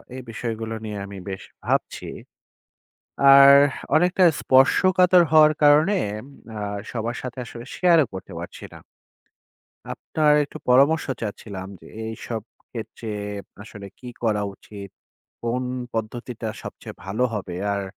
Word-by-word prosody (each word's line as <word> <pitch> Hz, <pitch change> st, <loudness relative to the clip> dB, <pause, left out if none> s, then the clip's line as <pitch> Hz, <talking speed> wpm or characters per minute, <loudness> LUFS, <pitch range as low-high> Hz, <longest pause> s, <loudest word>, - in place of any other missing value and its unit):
এই 130 Hz, -, -6 dB
বিষয়গুলো 115 Hz, 0 st, -4 dB
নিয়ে 105 Hz, -1 st, -5 dB
আমি 100 Hz, 0 st, -9 dB
বেশ 95 Hz, -1 st, -6 dB, 0.2 s
ভাবছি। -, -, -1 dB, 1.3 s
আর 140 Hz, 0 st, +9 dB, 0.4 s
অনেকটা 180 Hz, +3 st, +3 dB, 0.2 s
স্পর্শকাতর 180 Hz, +7 st, +5 dB
হওয়ার 155 Hz, -1 st, +7 dB
কারণে 150 Hz, +6 st, +5 dB, 0.3 s
ইম 120 Hz, -, -10 dB, 0.3 s
আ -, -, -5 dB, 0.3 s
সবার 120 Hz, 0 st, -3 dB
সাথে 130 Hz, 0 st, -7 dB
আসলে 120 Hz, +1 st, -9 dB
শেয়ারও 170 Hz, -5 st, +4 dB
করতে 95 Hz, 0 st, -8 dB
পারছি 85 Hz, -, -9 dB
না। -, -, -11 dB, 1.1 s
আপনার 150 Hz, -1 st, +1 dB
একটু 145 Hz, -, -9 dB
পরামর্শ 140 Hz, +6 st, +4 dB, 0.2 s
চাচ্ছিলাম 100 Hz, -3 st, -6 dB
যে, -, -, -17 dB, 0.2 s
এইসব 110 Hz, 0 st, -5 dB, 0.3 s
ক্ষেত্রে 115 Hz, -1 st, -7 dB, 0.5 s
আসলে 105 Hz, -2 st, -10 dB
কি 125 Hz, -, -11 dB, 0.2 s
করা 105 Hz, -2 st, +1 dB
উচিত? 100 Hz, 0 st, -11 dB, 0.5 s
কোন 120 Hz, +2 st, -1 dB, 0.3 s
পদ্ধতিটা 115 Hz, +1 st, -4 dB
সবচেয়ে -, -, -9 dB
ভালো 110 Hz, +6 st, -1 dB
হবে? 95 Hz, -4 st, -5 dB, 0.2 s
আর 100 Hz, -, -2 dB
120 Hz, 125 wpm, -23 LUFS, 105-145 Hz, 1.3 s, আর